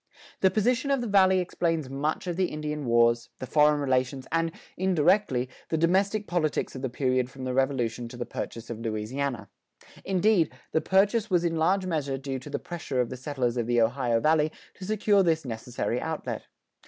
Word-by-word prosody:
This 190 - +4
position 245 +7 +1
of 275 -2 +2
the - - -2
Valley 190 -2 +5
explains 165 -4 -1
much 140 +6 -2
of 175 -2 -2
the 185 +1 +2
Indian 150 -2 -4
wars, 120 0 +3
the - - -6
foreign 150 +2 +4
relations, 130 -1 0
and, 165 0 +1 0.2
indirectly, 175 -7 +2 0.2
the 160 - 0
domestic 195 +6 +2
politics 160 -7 -1
of 130 - -6
the 130 - -2
period 130 0 0
from 135 -1 -10
the 130 0 -2
Revolution 125 -3 0
to 120 - -10
the 120 - -3
purchase 115 0 -6
of 115 - -5
Louisiana. 115 +1 -3 0.6
Indeed, 190 -2 +2 0.2
the 160 - +2
purchase 200 +6 +2
was 175 -3 +2
in 170 -1 0
large 185 +4 +2
measure 145 -6 -1
due 135 0 -4
to 130 - -10
the - - -2
pressure 160 -7 -4
of 125 -2 0
the - - -4
settlers 125 -2 -2
of 115 -1 -1
the 120 0 +2
Ohio 120 0 +2
Valley 155 +2 +3 0.2
to 185 - -9
secure 210 0 +3
this 160 -4 +1
necessary 120 +1 -3
outlet. 160 -1 -4
150 Hz, 190 wpm, -27 LUFS, 125-180 Hz, 0.6 s, Valley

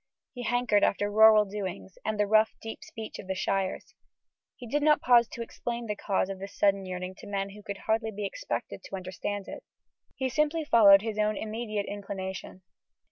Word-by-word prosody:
He 245 - -7
hankered 240 -3 +2
after 205 +1 +1
rural 215 0 +7
doings 195 -2 -6
and 215 -1 -2
the 210 - +4
rough 215 +1 +3
deep 225 +7 -8
speech 230 -9 -8
of 185 - -9
the 190 - -2
shires. 195 0 -2 0.6
He 245 - -10
did 295 +6 0
not 300 0 +4
pause 240 -2 +5
to 235 - -6
explain 235 +1 -5
the 210 -2 -3
cause 195 -2 0
of 195 -1 -6
this 195 +1 -9
sudden 195 -1 +2
yearning 185 0 -5
to - - -11
men 200 -1 -2
who 210 +1 -12
could 200 -1 -6
hardly 220 0 +1
be 210 -1 -5
expected - - -4
to - - -6
understand 190 +2 -5
it. - - -8 0.5
He 265 - -1
simply 300 +4 0
followed 205 -6 +7
his 220 -1 -3
own 210 -1 +1
immediate 215 -2 -3
inclination. 190 -2 -6
210 Hz, 190 wpm, -28 LUFS, 195-230 Hz, 0.6 s, rural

